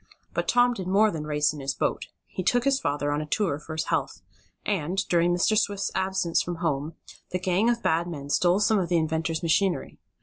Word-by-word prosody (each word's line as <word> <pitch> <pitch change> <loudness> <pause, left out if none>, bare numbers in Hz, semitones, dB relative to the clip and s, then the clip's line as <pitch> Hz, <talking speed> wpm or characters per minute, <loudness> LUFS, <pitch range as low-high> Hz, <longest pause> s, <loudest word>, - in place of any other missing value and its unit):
But - - -2
Tom 245 0 +4
did 190 -6 -6
more 205 +3 +4
than 150 -2 -5
race 150 0 +1
in 150 - -8
his 135 -1 -2
boat. - - -1 0.2
He - - -5
took 245 +6 +2
his 275 0 +2
father 145 - -1
on 145 +1 0
a 155 - -6
tour 160 -4 0
for 160 +1 -8
his 155 - 0
health, - - -2 0.4
and, 185 -3 -1
during 175 0 +3
Mr. 175 +5 +2
Swift's 205 -2 0
absence 190 -3 0
from 175 - -4
home, 160 -2 -2 0.3
the 180 - -1
gang 185 +5 +1
of 235 -1 0
bad 165 +2 +1
men 145 -4 -6
stole 180 +4 +3
some 210 0 +3
of 180 - -2
the 175 - +3
inventor's 160 0 -1
machinery. 175 +3 0
175 Hz, 215 wpm, -26 LUFS, 155-195 Hz, 0.4 s, Tom